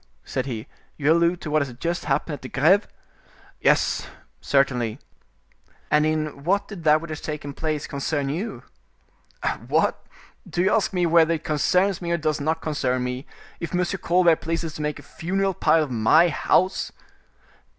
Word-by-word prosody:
said 130 0 -3
he, 115 -3 -4 0.3
"you 150 +1 +2
allude 170 +1 +3
to 150 - -6
what 155 0 +3
has 140 -3 -3
just 170 +5 -3
happened 145 +2 0
at 145 - -7
the 130 - -8
Greve?" 175 +9 +3 0.7
"Yes, - - +2 0.3
certainly." 125 -5 +1 0.9
"And 150 +1 +4
in 155 -2 -2
what 200 +4 +1
did 185 -6 -9
that 155 0 +5
which 165 -1 -7
has 155 - -5
taken 150 -2 -5
place 155 0 -2
concern 140 0 -2
you?" 175 +11 -4 1.0
"What! - - +1 0.5
do 175 - 0
you 190 - +3
ask 220 - +2
me 180 -2 +1
whether 165 0 +4
it 155 - -7
concerns 180 +4 +1
me 170 - -4
or 170 - +2
does 155 -2 -1
not 160 +3 -1
concern 130 -5 -1
me, 125 +2 -4 0.3
if 170 +1 -4
M. 180 0 +2 0.2
Colbert 170 -2 +4
pleases 165 -1 -3
to 150 - -6
make 150 0 -2
a - - -12
funeral 195 +3 -1
pile 165 -2 +3
of 145 - -6
my 125 +9 +4
house?" 185 +4 +1
155 Hz, 170 wpm, -24 LUFS, 145-170 Hz, 1.0 s, that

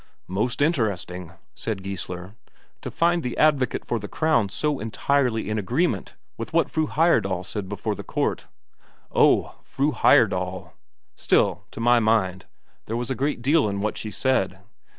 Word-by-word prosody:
"Most 120 +8 0
interesting," 100 - -1 0.2
said 105 -4 -4
Geissler, 95 -1 -6 0.5
"to - - -5
find 170 +1 +2
the 125 - -4
advocate 140 -5 +2
for 120 - -1
the 105 - -6
Crown 120 -10 +1
so 145 +7 -1
entirely 120 +1 0
in 110 0 -1
agreement 115 - -1 0.2
with 115 +7 -6
what 165 -3 +2
Fru 155 -1 0
Heyerdahl 120 - +2
said 100 -2 -5
before 105 +1 -2
the - - -7
court." - - -2 0.6
"Oh, - - +3
Fru 145 +3 0
Heyerdahl!... 90 - +2 0.4
Still, - - +1
to - - -10
my 120 +1 +4
mind, 105 -5 +1 0.4
there 115 - -2
was 120 +2 -3
a - - 0
great 135 -1 -2
deal 145 -3 +3
in 100 0 -3
what 105 +1 -1
she 110 - -5
said. 105 -6 0
115 Hz, 155 wpm, -24 LUFS, 100-140 Hz, 0.6 s, my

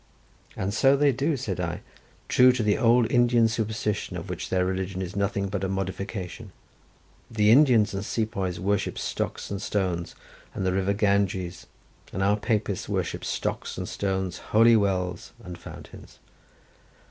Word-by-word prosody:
"And 95 +2 -2
so 135 +5 +4
they 145 0 +4
do," 140 +4 0
said 100 -8 -4
I, 85 -1 -3 0.5
"true 125 0 +6
to 125 -3 -1
the 105 -1 +3
old 120 -1 +3
Indian 120 -2 +4
superstition, 110 -2 -2
of - - -6
which - - -5
their 90 -1 +1
religion 95 0 -3
is 95 0 -5
nothing 100 0 0
but 95 -1 -3
a 95 - -1
modification. 95 -1 -4 0.8
The 105 -2 +3
Indians 120 -6 +5
and 100 0 -3
sepoys 105 -6 -2
worship 100 +2 -1
stocks - - -3
and 100 -1 -3
stones, 90 -5 -2 0.4
and 95 - -2
the 95 - +1
river 95 +1 +1
Ganges, 100 -3 0 0.4
and 95 - -2
our 100 +1 +3
Papists 105 -2 -1
worship - - -2
stocks - - -3
and - - -4
stones, 95 -3 -2
holy 115 +2 +4
wells 95 -4 -1
and 90 0 -7
fountains." - - -12
100 Hz, 155 wpm, -26 LUFS, 95-115 Hz, 0.8 s, true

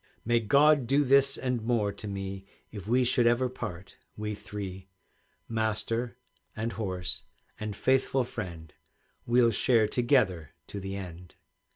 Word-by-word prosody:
"May 120 +1 +3
God 140 +4 +4
do 140 +3 +4
this 140 0 +4
and 125 -2 -1
more 110 -3 +1
to 105 - -8
me 95 -1 -5 0.3
If 100 -2 -8
we 125 +3 +3
should 125 -1 +3
ever 120 +2 +3
part, 90 -7 -7 0.2
we 105 0 -3
three, 95 -2 -7 0.6
Master 115 +2 -1 0.4
and 115 +2 -2
horse 90 -3 -3 0.4
and 105 -1 -4
faithful 130 +2 +2
friend, 90 -10 -7 0.5
We'll 120 0 +5
share 110 0 +3
together 105 - +1
to 100 - -5
the 95 0 -5
end!" 90 -2 -8
110 Hz, 140 wpm, -29 LUFS, 95-125 Hz, 0.6 s, We'll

